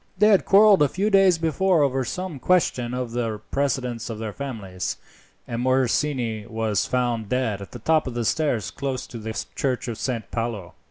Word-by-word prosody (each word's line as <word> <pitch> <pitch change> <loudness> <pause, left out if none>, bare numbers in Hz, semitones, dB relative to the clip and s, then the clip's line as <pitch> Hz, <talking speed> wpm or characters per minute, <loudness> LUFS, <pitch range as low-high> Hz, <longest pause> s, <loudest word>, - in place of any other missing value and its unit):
They 210 +3 +5
had 200 -3 +4
quarrelled 200 -1 +6
a 145 - +6
few 200 +9 -1
days 195 -3 +5
before 165 +1 +2
over 135 -1 +1
some 170 +4 -5
question 130 -7 +1
of 125 -2 -3
the 115 -3 -2
precedence 125 -4 -1
of 115 - -5
their 110 -1 -5
families, 105 -10 -5 0.5
and 120 0 -3
Morosini 125 -3 0
was 110 -2 -1
found 120 -4 -1
dead 120 -6 -1
at 100 - -8
the - - -7
top 155 +5 +1
of 125 - -5
the 120 -1 -1
steps 140 -7 0
close 135 -2 -3
to 115 - -9
the 110 0 -5 0.2
church 130 -2 -1
of 115 -2 -5
Saint 115 -5 -3
Paolo. 115 -6 -3
125 Hz, 185 wpm, -24 LUFS, 115-150 Hz, 0.5 s, quarrelled